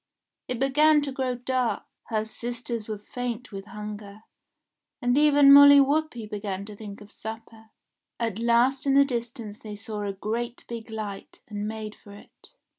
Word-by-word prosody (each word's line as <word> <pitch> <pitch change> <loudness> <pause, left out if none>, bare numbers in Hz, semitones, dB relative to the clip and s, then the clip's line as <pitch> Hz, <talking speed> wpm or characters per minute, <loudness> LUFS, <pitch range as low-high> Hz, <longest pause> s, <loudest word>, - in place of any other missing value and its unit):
It 250 - -3
began 295 +4 +4
to 280 - -3
grow 260 -1 -2
dark, 250 0 -1 0.2
her 215 -1 -1
sisters 235 0 -5
were 215 -1 -4
faint 245 +3 -5
with 195 -1 -7
hunger, 210 0 -8 0.8
and 245 0 +1
even 290 -1 +7
Molly 285 0 +10
Whuppie 280 -4 +1
began 200 -2 -5
to 210 0 -10
think 205 0 -9
of 205 +1 -14
supper. 225 0 -9 0.5
At 225 -3 -2
last 240 +4 +2
in 275 - +4
the 280 0 +7
distance 235 -4 -5
they 210 -1 -8
saw 210 0 -5
a 200 -1 -2
great 235 +5 -4
big 230 -2 -7
light, 210 -3 -7
and 205 0 -4
made 215 -1 -5
for 205 - -15
it. 205 - -17
230 Hz, 165 wpm, -26 LUFS, 210-255 Hz, 0.8 s, Molly